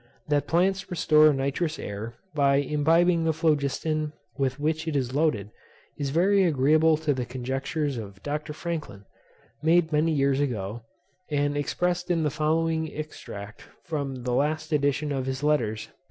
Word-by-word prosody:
That 145 Hz, -1 st, +1 dB
plants 190 Hz, +3 st, +1 dB
restore 155 Hz, -3 st, +5 dB
noxious 140 Hz, +4 st, -1 dB
air, 105 Hz, +3 st, -6 dB, 0.2 s
by 140 Hz, -2 st, +3 dB
imbibing 165 Hz, +5 st, +3 dB
the 160 Hz, 0 st, +2 dB
phlogiston 155 Hz, 0 st, 0 dB, 0.2 s
with 135 Hz, -1 st, -1 dB
which 160 Hz, +2 st, -1 dB
it 160 Hz, -, -1 dB
is 130 Hz, -2 st, -1 dB
loaded, 135 Hz, -9 st, 0 dB, 0.4 s
is 140 Hz, -2 st, -3 dB
very 190 Hz, +7 st, +3 dB
agreeable 155 Hz, 0 st, +4 dB
to 155 Hz, -2 st, 0 dB
the 130 Hz, -2 st, -2 dB
conjectures 135 Hz, +3 st, -3 dB
of 100 Hz, -3 st, -10 dB
Dr. 150 Hz, +1 st, -3 dB
Franklin, 150 Hz, -, -5 dB, 0.6 s
made 165 Hz, +1 st, +3 dB
many 155 Hz, +2 st, +3 dB
years 140 Hz, -2 st, +2 dB
ago, 115 Hz, -5 st, -2 dB, 0.5 s
and 145 Hz, -1 st, 0 dB
expressed 175 Hz, +5 st, -1 dB
in 170 Hz, -2 st, +2 dB
the 150 Hz, -, +1 dB
following 160 Hz, +1 st, 0 dB
extract 105 Hz, -9 st, -8 dB, 0.2 s
from 140 Hz, -6 st, -4 dB
the 125 Hz, 0 st, -1 dB
last 155 Hz, +4 st, 0 dB
edition 145 Hz, 0 st, +1 dB
of 135 Hz, -2 st, -2 dB
his 130 Hz, +1 st, -3 dB
Letters, 110 Hz, -8 st, +1 dB
p. -, -, -24 dB
150 Hz, 155 wpm, -26 LUFS, 135-160 Hz, 0.6 s, restore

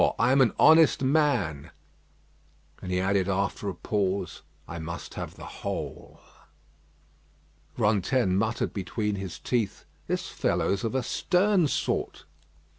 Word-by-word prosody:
I -, -, +3 dB
am 135 Hz, +1 st, +5 dB
an 120 Hz, -5 st, +4 dB
honest 160 Hz, -3 st, +6 dB
man." 125 Hz, -, +1 dB, 1.1 s
And 90 Hz, -, -5 dB
he 90 Hz, -, +1 dB
added 95 Hz, 0 st, +1 dB
after 100 Hz, +1 st, -1 dB
a 95 Hz, -, -5 dB
pause: 100 Hz, +1 st, -2 dB, 0.3 s
"I 85 Hz, -, -6 dB
must 80 Hz, 0 st, -7 dB
have -, -, -6 dB
the -, -, -10 dB
whole." -, -, -6 dB, 1.6 s
Rantaine 105 Hz, -1 st, +2 dB
muttered 110 Hz, +3 st, 0 dB
between 105 Hz, +1 st, -2 dB
his 95 Hz, -2 st, -6 dB
teeth, 115 Hz, -6 st, -2 dB, 0.2 s
"This -, -, -2 dB
fellow's 100 Hz, -, 0 dB
of 115 Hz, +2 st, -2 dB
a 130 Hz, -, +1 dB
stern 180 Hz, +2 st, +2 dB
sort." -, -, -2 dB
105 Hz, 125 wpm, -27 LUFS, 95-130 Hz, 1.6 s, honest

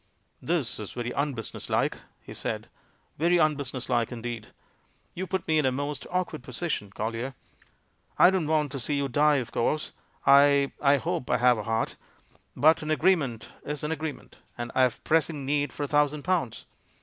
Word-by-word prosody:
"This 155 Hz, -7 st, -1 dB
is 105 Hz, -, -7 dB
very 120 Hz, 0 st, -3 dB
unbusiness 135 Hz, -5 st, -3 dB
like," -, -, +1 dB, 0.2 s
he -, -, -10 dB
said, -, -, -4 dB, 0.5 s
"very 170 Hz, +3 st, +4 dB
unbusiness 140 Hz, -6 st, 0 dB
like 120 Hz, -2 st, +1 dB
indeed 120 Hz, -2 st, -5 dB, 0.7 s
You 185 Hz, +2 st, -4 dB
put 190 Hz, -1 st, -3 dB
me 160 Hz, -1 st, +3 dB
in 150 Hz, -, +1 dB
a -, -, +2 dB
most 145 Hz, +3 st, -4 dB
awkward 180 Hz, -5 st, -2 dB
position, 130 Hz, -, -3 dB
Collier. 115 Hz, +6 st, -4 dB, 0.8 s
I 180 Hz, -, +7 dB
don't 185 Hz, -5 st, 0 dB
want 150 Hz, -3 st, +1 dB
to 140 Hz, -, -4 dB
see 145 Hz, +4 st, -1 dB
you 140 Hz, -1 st, 0 dB
die, 145 Hz, +3 st, +3 dB
of 125 Hz, -4 st, -2 dB
course 150 Hz, +6 st, 0 dB, 0.2 s
— -, -, -33 dB
I 140 Hz, 0 st, +6 dB
— -, -, -26 dB
I 140 Hz, 0 st, +5 dB
hope 165 Hz, -2 st, -3 dB
I 125 Hz, -, +3 dB
have 125 Hz, -1 st, +4 dB
a -, -, -4 dB
heart 115 Hz, 0 st, -1 dB, 0.3 s
— -, -, -33 dB, 0.2 s
but 155 Hz, +2 st, +4 dB
an 155 Hz, -, -5 dB
agreement 155 Hz, -, +1 dB
is 150 Hz, -1 st, -4 dB
an 150 Hz, -, -1 dB
agreement, 160 Hz, -2 st, -5 dB, 0.2 s
and 120 Hz, 0 st, -4 dB
I -, -, +3 dB
have 125 Hz, -2 st, +1 dB
pressing 155 Hz, -3 st, +1 dB
need 145 Hz, 0 st, 0 dB
for 145 Hz, -, -5 dB
a -, -, -1 dB
thousand 150 Hz, 0 st, +1 dB
pounds. 130 Hz, -10 st, -1 dB
145 Hz, 190 wpm, -27 LUFS, 125-155 Hz, 0.8 s, I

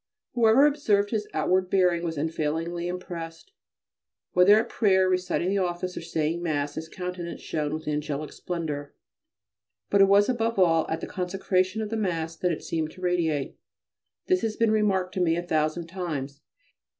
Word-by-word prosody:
Whoever 240 Hz, +3 st, +5 dB
observed 215 Hz, -9 st, +2 dB
his 215 Hz, -2 st, -1 dB
outward 185 Hz, 0 st, +1 dB
bearing 180 Hz, -3 st, +3 dB
was 165 Hz, -2 st, -3 dB
unfailingly 160 Hz, +3 st, -2 dB
impressed. 175 Hz, -, -7 dB, 0.8 s
Whether 195 Hz, +4 st, +6 dB
at 225 Hz, -, -1 dB
prayer, 190 Hz, -4 st, +3 dB
reciting 180 Hz, -1 st, 0 dB
the 200 Hz, +1 st, +1 dB
office, 180 Hz, 0 st, -2 dB
or -, -, -5 dB
saying 165 Hz, 0 st, -2 dB
Mass, 145 Hz, -4 st, -1 dB
his 160 Hz, +1 st, -6 dB
countenance 180 Hz, -1 st, -6 dB
shone 150 Hz, -2 st, -2 dB
with 155 Hz, 0 st, -5 dB
angelic 150 Hz, 0 st, -3 dB
splendour, 150 Hz, -5 st, -5 dB, 1.0 s
but 200 Hz, -, +5 dB
it -, -, +9 dB
was 200 Hz, +1 st, +5 dB
above 230 Hz, -3 st, 0 dB
all 165 Hz, -4 st, +3 dB
at 160 Hz, -, -2 dB
the -, -, -3 dB
consecration 185 Hz, +2 st, -1 dB
of 210 Hz, -, -6 dB
the 225 Hz, -, -1 dB
Mass 165 Hz, -5 st, -2 dB
that 180 Hz, +2 st, 0 dB
it 160 Hz, -, -4 dB
seemed 160 Hz, -1 st, -2 dB
to 185 Hz, -, -14 dB
radiate. 165 Hz, -6 st, -1 dB, 0.7 s
This 370 Hz, 0 st, +2 dB
has 220 Hz, -1 st, -1 dB
been 230 Hz, -1 st, +2 dB
remarked 195 Hz, -4 st, +1 dB
to 190 Hz, -, -1 dB
me 165 Hz, -2 st, +3 dB
a 175 Hz, -, -2 dB
thousand 155 Hz, 0 st, 0 dB
times. 155 Hz, -6 st, -5 dB
180 Hz, 170 wpm, -26 LUFS, 160-195 Hz, 1.0 s, it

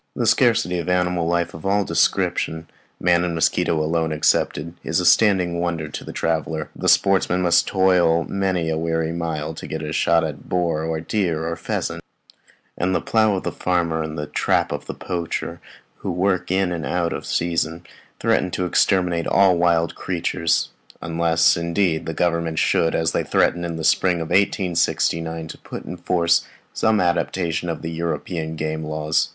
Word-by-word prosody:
The 120 Hz, -, -1 dB
scarcity 110 Hz, -6 st, +3 dB
of 85 Hz, +1 st, -4 dB
animal 90 Hz, -2 st, +1 dB
life 85 Hz, 0 st, 0 dB
of 80 Hz, -, -10 dB
all 100 Hz, +1 st, +2 dB
descriptions, 80 Hz, -2 st, 0 dB, 0.3 s
man 85 Hz, -1 st, +3 dB
and 85 Hz, -1 st, -2 dB
mosquitoes 80 Hz, -1 st, +1 dB
alone 80 Hz, 0 st, 0 dB
excepted, 75 Hz, +1 st, 0 dB
is -, -, 0 dB
a -, -, -1 dB
standing 90 Hz, -6 st, +4 dB
wonder 85 Hz, -3 st, -2 dB
to -, -, -7 dB
the -, -, -8 dB
traveller; 80 Hz, -1 st, -2 dB
the -, -, 0 dB
sportsman 90 Hz, -2 st, +3 dB
must 85 Hz, -1 st, +3 dB
toil 90 Hz, -3 st, +3 dB
many 95 Hz, -3 st, -1 dB
a 80 Hz, 0 st, -1 dB
weary 80 Hz, 0 st, -1 dB
mile 80 Hz, -2 st, -3 dB
to -, -, -8 dB
get 80 Hz, 0 st, -5 dB
a 75 Hz, 0 st, -4 dB
shot 85 Hz, +1 st, +3 dB
at 80 Hz, -2 st, -6 dB
boar, 85 Hz, -3 st, 0 dB
or 80 Hz, 0 st, -2 dB
deer, 85 Hz, -4 st, -1 dB
or 85 Hz, -, -2 dB
pheasant; 85 Hz, 0 st, -4 dB, 0.7 s
and 95 Hz, +1 st, 0 dB
the -, -, +2 dB
plough 110 Hz, -2 st, +2 dB
of 95 Hz, -, -3 dB
the -, -, -2 dB
farmer 85 Hz, -3 st, 0 dB
and 80 Hz, 0 st, -5 dB
the 75 Hz, -, -3 dB
trap -, -, 0 dB
of 75 Hz, 0 st, -5 dB
the -, -, -5 dB
poacher, 85 Hz, -2 st, -4 dB, 0.4 s
who -, -, -5 dB
works 90 Hz, 0 st, 0 dB
in 95 Hz, 0 st, +1 dB
and 85 Hz, -2 st, -3 dB
out 85 Hz, +5 st, -1 dB
of -, -, -5 dB
season, 85 Hz, 0 st, -1 dB, 0.3 s
threaten 90 Hz, -, +1 dB
to 90 Hz, +1 st, -2 dB
exterminate 90 Hz, -2 st, +1 dB
all 95 Hz, -2 st, +4 dB
wild 85 Hz, -1 st, +2 dB
creatures; 85 Hz, -2 st, -1 dB, 0.3 s
unless, 85 Hz, 0 st, +2 dB
indeed, 85 Hz, 0 st, 0 dB
the 80 Hz, -, -2 dB
Government 85 Hz, -2 st, 0 dB
should, 80 Hz, -, +2 dB
as 80 Hz, 0 st, +1 dB
they -, -, 0 dB
threatened 85 Hz, 0 st, +1 dB
in 85 Hz, -1 st, -4 dB
the 80 Hz, -, -5 dB
spring 90 Hz, +2 st, +2 dB
of 80 Hz, -1 st, -5 dB
1869, 85 Hz, -4 st, 0 dB
put -, -, -8 dB
in -, -, -6 dB
force 85 Hz, -1 st, +2 dB, 0.3 s
some 110 Hz, -1 st, +2 dB
adaptation 85 Hz, -1 st, 0 dB
of 80 Hz, 0 st, -5 dB
European 80 Hz, 0 st, -3 dB
game 80 Hz, 0 st, -3 dB
laws. 75 Hz, +1 st, 0 dB
85 Hz, 175 wpm, -22 LUFS, 80-90 Hz, 0.7 s, standing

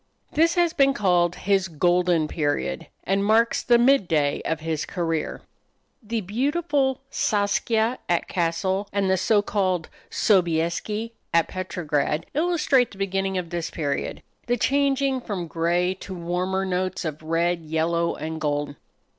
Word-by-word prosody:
This 330 Hz, +1 st, +3 dB
has 345 Hz, -2 st, +2 dB
been 275 Hz, 0 st, +3 dB
called 180 Hz, -6 st, +2 dB
his 195 Hz, -1 st, +1 dB
"golden 175 Hz, 0 st, +2 dB
period," 150 Hz, +2 st, -2 dB, 0.2 s
and 195 Hz, +1 st, +1 dB
marks 225 Hz, +3 st, +3 dB
the 240 Hz, -1 st, +4 dB
midday 180 Hz, -, +3 dB
of 160 Hz, -, -1 dB
his 160 Hz, -1 st, -2 dB
career. 165 Hz, -3 st, -3 dB, 0.6 s
The 225 Hz, 0 st, -3 dB
beautiful 270 Hz, -, 0 dB
"Saskia," 220 Hz, +3 st, +1 dB
at 175 Hz, -1 st, +1 dB
Cassel, 185 Hz, +3 st, -1 dB
and 195 Hz, -1 st, +1 dB
the -, -, +4 dB
so 205 Hz, +2 st, +3 dB
called 185 Hz, -5 st, 0 dB, 0.2 s
"Sobieski," 185 Hz, +4 st, +1 dB, 0.2 s
at 170 Hz, -, +4 dB
Petrograd, 155 Hz, -5 st, -2 dB
illustrate 305 Hz, -6 st, +2 dB
the 195 Hz, -, -14 dB
beginning 195 Hz, -1 st, -1 dB
of 175 Hz, -2 st, -4 dB
this 170 Hz, -1 st, -3 dB
period 145 Hz, -4 st, -3 dB, 0.2 s
the 245 Hz, 0 st, +1 dB
changing 275 Hz, 0 st, +1 dB
from 200 Hz, -7 st, -4 dB
gray 170 Hz, +3 st, 0 dB
to 190 Hz, -, -7 dB
warmer 180 Hz, +2 st, -1 dB
notes 185 Hz, 0 st, -2 dB
of 155 Hz, -1 st, -4 dB
red, 170 Hz, +2 st, 0 dB
yellow, 165 Hz, +2 st, 0 dB
and 160 Hz, +1 st, -5 dB
gold. 145 Hz, -1 st, -1 dB
185 Hz, 140 wpm, -24 LUFS, 165-220 Hz, 0.6 s, the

